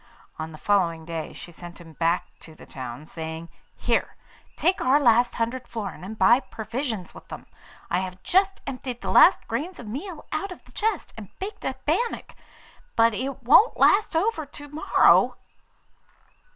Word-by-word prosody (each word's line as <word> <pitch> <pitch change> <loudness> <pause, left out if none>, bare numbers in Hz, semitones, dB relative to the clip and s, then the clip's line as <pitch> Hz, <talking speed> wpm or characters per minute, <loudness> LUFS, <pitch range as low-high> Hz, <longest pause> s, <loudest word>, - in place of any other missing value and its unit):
On 160 0 -4
the 155 - -10
following 170 -4 +1
day 165 -1 -5
she 175 - -11
sent 175 +1 -11
him 165 -2 -13
back 165 +3 +1
to 160 - -14
the - - -14
town, 130 +2 -8
saying, 160 +1 -7 0.3
'Here, - - 0 0.4
take 365 +3 +1
our 265 +3 +4
last 240 -2 +4
hundred 235 +2 -2
florins, 210 -6 -6
and 215 +4 -7
buy 235 +3 +6
provisions 225 - -5
with - - -13
them. - - -9 0.4
I 175 - +1
have 185 0 -6
just 385 +1 +2
emptied 255 -2 -5
the - - -3
last - - +6
grains 350 +5 -3
of 240 - -9
meal 305 - -6
out 365 +5 -2
of 360 - -11
the - - -19
chest, 430 -4 -2
and 210 -4 -9
baked 395 +3 -7
a - - -1
bannock; 475 -1 -1 0.6
but 230 0 +4
it 260 +3 -4
won't 305 - +6
last 410 -4 +4
over 340 -1 +1
to 290 0 -11
morrow. 300 +2 +4
230 Hz, 170 wpm, -25 LUFS, -, 0.6 s, buy